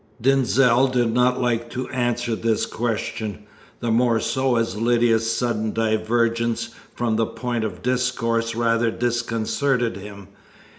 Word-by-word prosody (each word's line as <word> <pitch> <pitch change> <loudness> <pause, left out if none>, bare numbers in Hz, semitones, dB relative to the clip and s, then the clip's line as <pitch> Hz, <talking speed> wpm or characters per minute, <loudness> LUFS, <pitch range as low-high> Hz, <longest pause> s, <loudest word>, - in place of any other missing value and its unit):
Denzil 130 0 +3
did 120 -3 +1
not 125 +1 +2
like 120 -1 0
to 125 +1 -4
answer 120 -2 -1
this 115 0 0
question, 110 -2 -3 0.4
the 120 - -1
more 115 0 +3
so 130 +1 0
as 115 -4 0
Lydia's 115 0 +2
sudden 115 -2 -1
divergence 115 +1 0 0.3
from 115 -2 0
the 115 -1 +1
point 120 -2 -3
of 110 - -5
discourse 115 -2 0
rather 115 0 +2
disconcerted 120 0 -1
him. 100 -1 -10
115 Hz, 130 wpm, -22 LUFS, 115-125 Hz, 0.4 s, Denzil